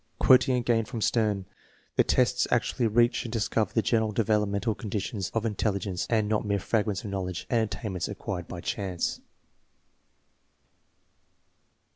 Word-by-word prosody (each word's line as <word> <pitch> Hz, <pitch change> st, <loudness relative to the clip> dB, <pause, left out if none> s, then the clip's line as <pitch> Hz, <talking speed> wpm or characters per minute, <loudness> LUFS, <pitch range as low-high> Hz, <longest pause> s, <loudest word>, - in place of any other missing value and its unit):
Quoting 130 Hz, 0 st, +5 dB
again 120 Hz, -2 st, +2 dB
from 120 Hz, -1 st, -6 dB
Stern, 105 Hz, -3 st, +1 dB, 0.3 s
" -, -, -35 dB
The -, -, +5 dB
tests 125 Hz, -1 st, +2 dB
actually 120 Hz, 0 st, +1 dB
reach 120 Hz, +2 st, +3 dB
and 115 Hz, -, -6 dB
discover 110 Hz, -1 st, 0 dB
the 115 Hz, -, +1 dB
general 110 Hz, -1 st, +1 dB
developmental 105 Hz, 0 st, +1 dB
conditions 105 Hz, -2 st, -4 dB
of 115 Hz, -, +1 dB
intelli 105 Hz, -2 st, 0 dB
gence, 95 Hz, -3 st, -3 dB
and 110 Hz, -3 st, +2 dB
not 105 Hz, 0 st, +1 dB
mere 100 Hz, -1 st, 0 dB
fragments 105 Hz, 0 st, -1 dB
of 100 Hz, -, -5 dB
knowledge 90 Hz, -2 st, -3 dB
and 120 Hz, -2 st, +3 dB
attain 105 Hz, -4 st, -4 dB
ments 90 Hz, -3 st, -2 dB
acquired 90 Hz, -3 st, -5 dB
by 90 Hz, -, -7 dB
chance." 95 Hz, -3 st, -2 dB
110 Hz, 150 wpm, -27 LUFS, 100-115 Hz, 0.3 s, Quoting